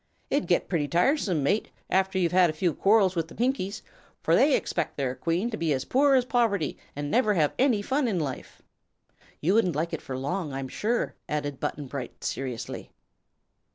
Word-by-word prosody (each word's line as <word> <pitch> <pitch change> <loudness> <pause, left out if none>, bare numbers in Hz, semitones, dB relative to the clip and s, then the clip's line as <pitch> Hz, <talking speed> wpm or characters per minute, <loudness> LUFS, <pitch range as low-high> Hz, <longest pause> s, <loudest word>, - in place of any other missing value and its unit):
"It'd 285 -5 0
get 175 - +2
pretty 160 -6 0
tiresome, 180 - +2
mate, 200 +10 +1 0.2
after 190 0 +1
you'd 175 -3 +2
had 180 -1 +5
a - - -2
few 165 +1 0
quarrels 195 0 +3
with 165 -1 -1
the - - -13
Pinkies, 235 -5 -1 0.4
for - - +4
they 280 0 +5
expec' 165 -3 -2
their 135 -3 -1
Queen 170 - -1
to 220 - -3
be 160 -3 +1
as 130 - -2
poor 275 +1 +4
as 255 -2 +3
poverty 225 - +1 0.2
an' 145 0 -4
never 215 -3 +3
have 155 -4 +2
any 245 -6 +3
fun 265 +3 +1
in 195 -6 0
life." 140 -4 -6 0.8
"You 175 +6 +2
wouldn't 195 -8 +2
like 160 +3 -2
it - - -3
for 130 - -5
long, 150 +3 -3
I'm 135 -1 -4
sure," 235 - -1 0.2
added 145 -2 -2
Button 145 - -3
Bright, 130 -2 -7
seriously. 130 -4 -4
180 Hz, 190 wpm, -27 LUFS, 145-220 Hz, 0.8 s, had